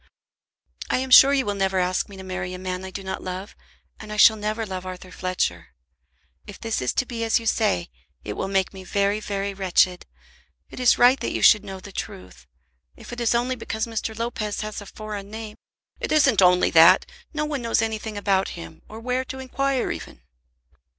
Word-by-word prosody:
"I - - +2
am 260 0 -3
sure 270 +2 +9
you 270 -2 +2
will 205 - -1
never 195 -1 0
ask 180 +2 0
me 200 - -11
to 190 - -9
marry 185 -1 -5
a - - -6
man 185 0 -4
I 190 - -6
do 195 +1 -7
not 190 - -5
love, 185 +3 -6 0.4
and 215 - -9
I 210 - -5
shall 220 +1 +7
never 215 +1 -3
love 185 -2 -5
Arthur 185 0 -8
Fletcher. 85 - -3 0.7
If 205 - -10
this 225 - -2
is 125 - 0
to 260 - 0
be 235 -2 -4
as 225 +1 +2
you 230 - -10
say, 90 - 0 0.3
it 105 - -5
will 190 - -3
make 195 -1 0
me 190 -1 -9
very, 200 +2 0
very 200 -1 -3
wretched. 185 -1 +1 0.6
It - - -9
is 250 -2 +4
right 250 +2 +5
that - - -2
you - - -2
should 210 - +7
know 190 -1 -7
the 195 +2 -11
truth. 90 - -8 0.5
If - - -11
it 240 - -5
is 235 0 +2
only 250 +2 0
because 220 -2 -3
Mr. 225 -1 -4
Lopez 225 -3 -3
has 215 0 -5
a 200 - -11
foreign 210 -2 -7
name 220 0 -7 0.3
" - - -69
"It - - -4
isn't 295 -10 +4
only 180 0 +4
that; 165 0 +7 0.3
no 300 -1 -2
one 295 -3 -3
knows 230 -1 +1
anything 220 -1 -4
about 195 -1 +1
him, 80 -1 -10
or 220 - -9
where 250 +2 -1
to 265 - -7
inquire 265 0 -1
even." - - -8
205 Hz, 210 wpm, -24 LUFS, 185-230 Hz, 0.7 s, sure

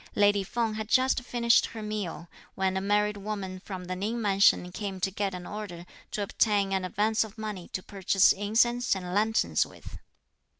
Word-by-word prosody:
Lady 205 -1 +4
Feng 225 +2 -1
had 215 0 -4
just 260 +1 +3
finished 235 -1 +3
her 225 -2 -8
meal, 200 -6 -4 0.3
when 190 0 0
a 190 - 0
married 210 +1 +1
woman 195 -2 -5
from 185 -1 -7
the 185 +1 -4
Ning 215 +6 -2
mansion 195 -4 +3
came 195 0 -5
to 190 +1 0
get 195 -1 -2
an 180 0 -7
order 195 -5 -7 0.2
to 205 - -2
obtain 200 -1 +1
an 190 -1 0
advance 215 +5 +1
of 220 -1 -11
money 210 -5 -5
to 185 - -5
purchase 195 -1 +3
incense 230 +4 +2
and 180 -1 -5
lanterns 220 +2 +2
with. - - -11
205 Hz, 180 wpm, -28 LUFS, 190-215 Hz, 0.3 s, Lady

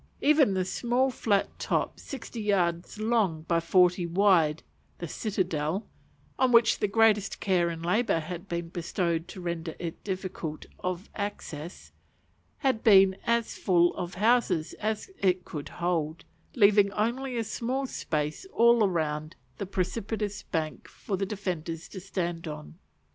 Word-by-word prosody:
Even 285 -8 +4
the 185 -1 0
small 245 +7 +1
flat 205 -5 0
top, - - -1
sixty 240 -3 -7
yards 180 -4 0
long 215 -8 +1
by 165 +1 +1
forty 180 +1 +3
wide, 170 -4 +3 0.3
the 170 - -5
citadel, 185 -2 -2 0.5
on 260 -1 +4
which 235 -1 +5
the 210 - +1
greatest 210 -1 +3
care 180 -3 +2
and 165 0 -5
labour 200 0 +2
had 175 +3 -6
been 170 -1 -3
bestowed 170 -1 -2
to - - -9
render 170 -2 -4
it 170 -2 -6
difficult 185 -5 -4
of 185 +1 -3
access, 175 -6 -6 0.7
had 265 -6 0
been 195 -3 +7
as 235 -1 +1
full 175 -3 +3
of 175 0 -5
houses 215 -6 +2
as 215 - -2
it 185 -1 +1
could 145 -2 -6
hold; 170 -2 -2 0.3
leaving 205 -3 +5
only 245 +5 -1
a 230 - 0
small 245 +5 -2
space 155 - -3
all 235 -3 +5
round 155 -2 -2 0.2
the 200 - -3
precipitous 205 +2 -2
bank 160 -3 -4
for 200 - -4
the 195 +1 -2
defenders 175 -5 -4
to 190 - -8
stand 175 -3 -3
on. 115 - -7
185 Hz, 145 wpm, -28 LUFS, 170-215 Hz, 0.7 s, been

